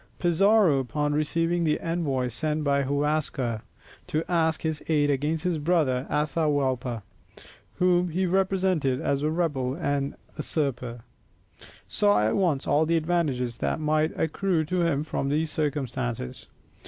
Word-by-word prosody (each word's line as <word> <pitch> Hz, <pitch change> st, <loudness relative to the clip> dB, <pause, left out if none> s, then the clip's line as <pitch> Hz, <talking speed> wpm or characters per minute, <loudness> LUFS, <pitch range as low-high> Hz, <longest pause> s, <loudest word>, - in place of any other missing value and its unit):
Pizarro 180 Hz, -2 st, +4 dB
upon 145 Hz, +4 st, -1 dB
receiving 165 Hz, +3 st, 0 dB
the 155 Hz, -2 st, +1 dB
envoys 140 Hz, -8 st, -1 dB
sent 155 Hz, +1 st, -1 dB
by 140 Hz, -1 st, +2 dB
Huascar, 140 Hz, -4 st, -1 dB, 0.5 s
to 155 Hz, +1 st, -1 dB
ask 160 Hz, -2 st, +1 dB
his 160 Hz, -2 st, -2 dB
aid 145 Hz, -2 st, +3 dB
against 150 Hz, +4 st, -1 dB
his 175 Hz, -4 st, 0 dB
brother 145 Hz, -5 st, +1 dB
Atahualpa, 140 Hz, -6 st, 0 dB, 0.7 s
whom 180 Hz, 0 st, +2 dB
he 185 Hz, +4 st, 0 dB
represented 185 Hz, -7 st, +1 dB
as 140 Hz, +1 st, 0 dB
a 150 Hz, -, +1 dB
rebel 145 Hz, -6 st, -1 dB
and 145 Hz, -3 st, -1 dB, 0.2 s
usurper, 130 Hz, -6 st, -3 dB, 0.9 s
saw 105 Hz, 0 st, +3 dB
at 110 Hz, -, 0 dB
once 165 Hz, -8 st, +1 dB
all 150 Hz, +3 st, +2 dB
the 165 Hz, 0 st, +3 dB
advantages 155 Hz, -8 st, 0 dB
that -, -, -1 dB
might 155 Hz, +1 st, 0 dB
accrue 165 Hz, 0 st, 0 dB
to 180 Hz, +3 st, 0 dB
him 160 Hz, -4 st, +1 dB
from 140 Hz, -3 st, -2 dB
these 155 Hz, +2 st, 0 dB
circumstances. 135 Hz, -, -3 dB
150 Hz, 135 wpm, -26 LUFS, 135-165 Hz, 0.9 s, Pizarro